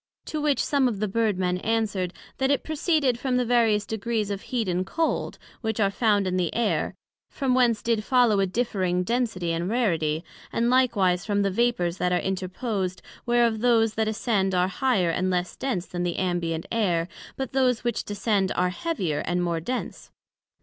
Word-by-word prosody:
To 310 - -3
which 295 -2 +1
some 280 -3 +2
of 220 -5 -2
the 215 - 0
Bird 215 -1 0
men 180 -1 0
answered, 205 -4 -1 0.3
That 265 0 +2
it 280 - +1
proceeded 305 -5 +1
from 255 -1 0
the 250 - +1
various 225 -4 +3
degrees 220 0 -2
of 200 -1 -3
heat 240 -5 -2
and 180 0 0
cold, 320 - -1 0.2
which 220 -2 -2
are 200 -2 +3
found 205 -2 +2
in 185 0 0
the 175 -3 0
Air, 230 -2 0 0.3
from 270 -3 -1
whence 240 -4 +3
did 230 -2 +1
follow 240 -4 +3
a 195 - +2
differing 185 -4 0
density 215 -6 -1
and 170 +2 -1
rarity; 165 -9 0 0.3
and 235 +1 +1
likewise 200 -9 +3
from 205 -1 0
the 195 - +1
vapours 185 -5 +1
that 180 -1 0
are 180 - +3
interposed, 190 +1 -3 0.2
whereof 240 -2 +3
those 225 -2 +3
that 220 0 0
ascend 205 -3 0
are 180 +1 +2
higher 190 -4 +1
and 185 +3 0
less 180 -1 -1
dense 230 -10 -2
then 175 - -5
the 175 -1 -1
ambient 170 -3 -1
air, 180 -7 +1 0.3
but 265 -2 -4
those 255 -3 +2
which 240 -2 -1
descend 205 -2 0
are 180 0 +1
heavier 185 - -2
and 175 0 0
more 170 -1 0
dense. 250 +10 -5
210 Hz, 185 wpm, -25 LUFS, 180-240 Hz, 0.3 s, various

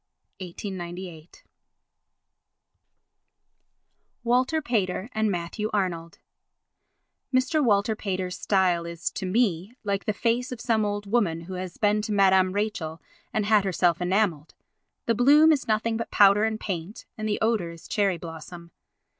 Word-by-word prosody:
[1898.] 175 -2 -8 2.8
Walter 255 +6 +2
Pater 215 -5 -2
and 220 0 +1
Matthew 185 +4 -3
Arnold 175 -5 -2 1.1
Mr. 270 +4 +2
Walter 215 -2 +2
Pater's 185 -3 -3
style 185 -4 +1
is, 170 0 -4
to 190 - -5
me, 200 0 0
like 200 -2 -2
the - - +1
face 240 +4 0
of 250 - -6
some 220 -3 +1
old 205 0 -3
woman 200 -7 0
who 180 +3 -8
has 185 -1 -6
been 210 0 +2
to 215 - -4
Madame 190 -2 +4
Rachel 200 -6 -3 0.3
and 215 -1 -1
had 210 -1 +4
herself 180 -2 +1
enamelled. 180 -4 0 0.5
The 230 - +2
bloom 290 +7 +6
is 290 -3 0
nothing 220 +1 0
but 230 - -4
powder 205 +1 +5
and 220 0 -2
paint 185 0 -5
and 215 0 -4
the 205 - 0
odour 220 -6 +1
is 170 -1 -12
cherry 200 -4 +1
blossom. 170 +1 -10
200 Hz, 140 wpm, -26 LUFS, 180-220 Hz, 2.8 s, bloom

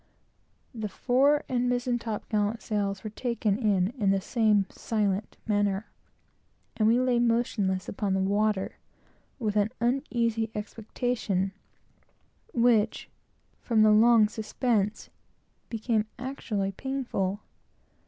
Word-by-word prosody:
The 220 -3 -4
fore 270 +8 +2
and 245 -1 0
mizen 245 0 0
top 225 -2 -5
gallant 210 +1 -1
sails 200 -3 -2
were 215 - -5
taken 225 -3 -1
in, 200 -5 +2
in 200 -3 +2
the 195 0 +3
same 210 -1 +2
silent 205 -2 -2
manner; 205 -1 0 0.8
and 215 - +2
we 235 +2 +4
lay 250 -1 +2
motionless 230 -6 +1
upon 200 -1 -1
the - - +1
water, 205 0 0 0.6
with 215 -5 -2
an 210 0 +2
uneasy 235 -3 0
expectation, 210 -2 -2 1.0
which, 230 -2 +2 0.5
from 225 -3 +2
the 215 - +6
long 220 0 +6
suspense, 220 -1 -1 0.6
became 225 -1 0
actually 215 -7 -3
painful. 215 -5 -3
215 Hz, 115 wpm, -28 LUFS, 205-240 Hz, 1.0 s, the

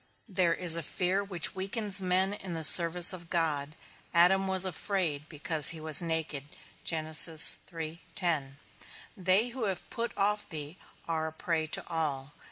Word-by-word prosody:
There 180 -5 -1
is 175 -3 +5
a - - -4
fear 185 +5 -3
which 185 -5 -1
weakens 195 +1 -1
men 185 +1 -1
in 190 -4 -8
the 160 - -5
service 170 +3 +7
of 170 -2 -10
God. 155 -3 -3 0.4
Adam 190 +3 +2
was 190 0 +2
afraid, 175 -6 -4
because 150 -1 +3
he 165 - -5
was 155 0 +4
naked. 160 -4 -5 0.4
They 160 +1 +3 1.5
who 240 0 -8
have 190 -3 -6
put 235 -1 -6
off 205 +1 -3
thee 155 +2 -8 0.3
are 160 -1 -4
a - - -8
prey 160 0 -5
to - - -6
all. 150 -4 -5
170 Hz, 145 wpm, -27 LUFS, 160-190 Hz, 1.5 s, service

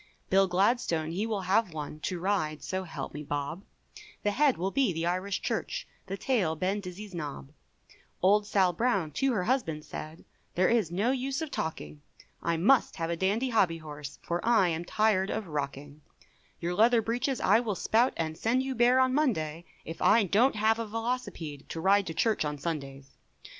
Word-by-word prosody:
Bill 195 0 +5
Gladstone 180 -4 +1
he 200 +6 -2
will 215 -3 -2
have 190 0 +1
one, 150 0 -6
To 175 +3 -3
ride, 170 -5 -1
so 190 0 -3
help 160 -5 -6
me 150 - -6
bob, 145 +5 -4 0.6
The 205 - +2
head 275 +4 +3
will 190 +3 -1
be 265 -4 +2
the 165 0 -2
Irish 185 +3 -1
Church, - - -3 0.2
The 195 +1 -4
tail 195 -10 +1
Ben 190 +5 -1
Dizzy's 195 +1 -8
nob 145 -5 -6 0.7
Old 205 +3 +3
Sal 190 -4 +3
Brown 195 -6 0
to 265 - +1
her 195 -5 0
husband 180 - -1
said 155 +2 -8 0.3
There 180 +1 +3
is 225 -8 +2
no 200 +8 +1
use 265 +1 -2
of 310 - -6
talking, 75 - -4 0.4
I 170 0 0
must 235 +10 +3
have 165 -1 -2
a - - 0
dandy 205 +9 0
hobby 190 -8 +2
horse, 150 -3 -8
For 170 0 -2
I 220 -6 +4
am 165 +1 -3
tired 205 -1 +2
of 220 - -2
rocking; 145 -1 -5 0.6
Your 175 +1 -2
leather 230 +4 +4
breeches 245 +4 -1
I - - +4
will 225 -4 -2
spout, 235 +7 +2
And 160 -1 -2
send 240 +9 +1
you 265 0 -2
bare 245 +1 +4
on 260 0 +3
Monday, 175 - 0 0.2
If 165 - -7
I 230 - +5
don't 220 +8 +3
have 220 +1 +2
a 230 - -3
Velocipede 210 - -4
To 165 - -5
ride 195 +3 +3
to 165 - -5
church 220 -1 +1
on 150 -1 -3
Sundays. 140 -3 -6
190 Hz, 190 wpm, -29 LUFS, 160-225 Hz, 0.7 s, Bill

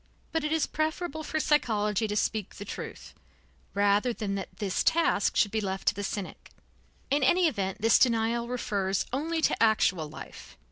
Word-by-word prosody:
But 325 -1 -1
it 300 - -1
is 320 -2 +2
preferable 315 0 -2
for 310 0 -2
psychology 220 -8 +1
to 210 - -3
speak 210 -1 -1
the 205 - -8
truth, - - -8 0.6
rather 205 +4 +3
than 210 -3 -3
that 195 -1 -6
this 200 -4 -1
task 325 -11 +2
should 205 - +3
be 220 - 0
left 195 -1 0
to - - -2
the 205 - -5
cynic. 200 -1 -5 0.6
In 285 +1 +3
any 350 +6 +4
event, 200 -6 -3
this 225 - +5
denial 235 -1 +2
refers 200 -6 -1
only 320 +4 -1
to - - +1
actual 190 -8 +3
life. 150 - -11
220 Hz, 175 wpm, -28 LUFS, 200-295 Hz, 0.6 s, this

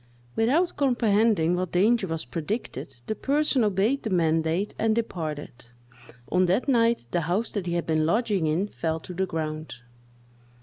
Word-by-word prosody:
Without 295 +11 +2
comprehending 220 - +2
what 180 -1 -3
danger 205 +3 +3
was 165 -4 -2
predicted, 155 - -4
the - - -2
person 280 +1 +1
obeyed 210 +7 +1
the 220 - -3
mandate 165 +1 +1
and 220 0 +2
departed. 155 - -4 0.6
On 180 0 +3
that 190 +11 +1
night 235 - +2
the 175 - +1
house 180 +8 -1
that 195 -4 -3
he 170 - -1
had 170 -1 -1
been 155 -1 +1
lodging 200 0 +1
in 170 +7 0
fell 160 -5 -3
to 180 - -9
the 190 +2 -1
ground. 155 -3 -4
185 Hz, 160 wpm, -26 LUFS, 160-225 Hz, 0.6 s, danger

